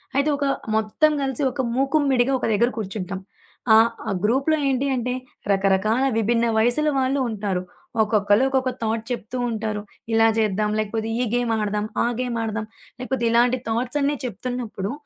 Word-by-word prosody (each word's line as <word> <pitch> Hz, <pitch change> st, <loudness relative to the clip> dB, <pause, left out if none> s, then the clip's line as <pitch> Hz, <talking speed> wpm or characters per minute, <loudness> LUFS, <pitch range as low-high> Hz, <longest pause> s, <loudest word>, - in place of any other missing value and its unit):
అయితే 280 Hz, +2 st, +2 dB
ఒక 285 Hz, -, -1 dB, 0.3 s
మొత్తం 220 Hz, +8 st, +2 dB
గలిసి 270 Hz, 0 st, -1 dB
ఒక 265 Hz, +1 st, -2 dB
మూకుమ్మడిగా 270 Hz, -1 st, +2 dB
ఒక -, -, -2 dB
దగ్గర 235 Hz, +4 st, +3 dB
కూర్చుంటాం, 195 Hz, -2 st, -4 dB, 0.6 s
ఆహ్, 225 Hz, +1 st, +6 dB, 0.2 s
ఆ -, -, 0 dB
గ్రూప్‌లో 270 Hz, +8 st, +2 dB
ఏంటి 270 Hz, +1 st, 0 dB
అంటే, 250 Hz, 0 st, -1 dB, 0.4 s
రకరకాల 195 Hz, +5 st, +2 dB
విభిన్న 230 Hz, +1 st, +2 dB
వయసుల 245 Hz, +7 st, +3 dB
వాళ్ళు 265 Hz, +1 st, +1 dB
ఉంటారు. 200 Hz, -4 st, -2 dB, 0.4 s
ఒక్కొక్కళ్ళు, 210 Hz, +1 st, +3 dB
ఒక్కొక్క 260 Hz, -1 st, +1 dB
థాట్ 220 Hz, 0 st, -1 dB
చెప్తూ 240 Hz, +1 st, -4 dB
ఉంటారు. 215 Hz, -2 st, -3 dB, 0.3 s
ఇలా 225 Hz, 0 st, +5 dB
జేద్దాం, 210 Hz, -1 st, +1 dB
లేకపోతే 220 Hz, +1 st, -2 dB
ఈ 250 Hz, -, +1 dB
గేమ్ 245 Hz, -1 st, 0 dB
ఆడదాం, 210 Hz, 0 st, -1 dB, 0.2 s
ఆ -, -, +2 dB
గేమ్ 245 Hz, -2 st, -2 dB
ఆడదాం 220 Hz, 0 st, -3 dB, 0.3 s
లేకపోతే 255 Hz, -1 st, -2 dB
ఇలాంటి 245 Hz, +2 st, +3 dB
థాట్స్ 245 Hz, +5 st, -1 dB
అన్ని 285 Hz, +1 st, +1 dB
చెప్తున్నప్పుడు, 235 Hz, -2 st, -4 dB
230 Hz, 150 wpm, -23 LUFS, 215-255 Hz, 0.6 s, ఆహ్